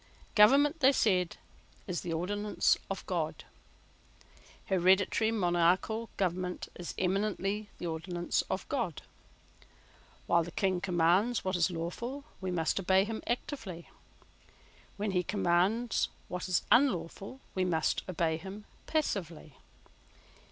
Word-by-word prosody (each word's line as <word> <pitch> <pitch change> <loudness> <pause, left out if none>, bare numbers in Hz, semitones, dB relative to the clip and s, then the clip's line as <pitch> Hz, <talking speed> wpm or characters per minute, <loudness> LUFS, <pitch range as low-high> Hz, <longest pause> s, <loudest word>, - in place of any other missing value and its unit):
Government, 280 +9 +5
they 270 -1 +6
said, 185 -8 +2 0.5
is 180 -3 -3
the 170 - -4
ordinance 205 +5 +1
of - - -4
God. - - -3 1.2
Hereditary 190 +4 +3
monarchical 185 +3 +1
government 180 -1 -2
is 175 - -7
eminently 200 +2 -1
the - - -6
ordinance 175 +1 -1
of 190 - -3
God. 235 - -2 1.2
While 170 -1 +3
the 170 - -7
King 185 +1 0
commands 185 +6 +2
what 185 0 0
is 175 0 +3
lawful 185 +11 -4 0.2
we 190 - -2
must 170 0 0
obey 190 0 +4
him 220 +1 -4
actively. 230 - -4 1.1
When 205 0 -1
he 180 -1 +2
commands 195 +4 +1 0.2
what 180 +1 -4
is 180 - +2
unlawful 220 -2 +2
we 185 - 0
must 165 -3 +1
obey 165 -2 0
him 195 +5 -9 0.2
passively. 175 - -2
190 Hz, 115 wpm, -31 LUFS, 175-215 Hz, 1.2 s, they